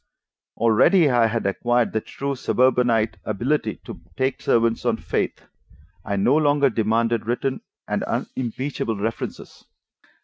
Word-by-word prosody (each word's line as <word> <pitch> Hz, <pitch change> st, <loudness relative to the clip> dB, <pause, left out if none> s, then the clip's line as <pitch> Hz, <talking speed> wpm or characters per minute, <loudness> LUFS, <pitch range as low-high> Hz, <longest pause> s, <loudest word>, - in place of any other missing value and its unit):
Already 140 Hz, -, +4 dB
I 120 Hz, -2 st, +4 dB
had 115 Hz, -1 st, -2 dB
acquired 120 Hz, +4 st, +1 dB
the 110 Hz, -, 0 dB
true 140 Hz, +5 st, -4 dB
suburbanite 125 Hz, -3 st, +2 dB
ability 110 Hz, +1 st, -1 dB
to -, -, -9 dB, 0.2 s
take 130 Hz, 0 st, -1 dB
servants 115 Hz, 0 st, +1 dB
on 120 Hz, -2 st, +1 dB
faith; -, -, -2 dB, 0.6 s
I 100 Hz, -, -2 dB
no 100 Hz, +8 st, +3 dB
longer 145 Hz, -3 st, +3 dB
demanded 115 Hz, +1 st, 0 dB
written 130 Hz, +2 st, -1 dB, 0.3 s
and -, -, -1 dB
unimpeachable 125 Hz, -1 st, -3 dB
references. 110 Hz, +3 st, -5 dB
120 Hz, 125 wpm, -23 LUFS, 110-130 Hz, 0.6 s, Already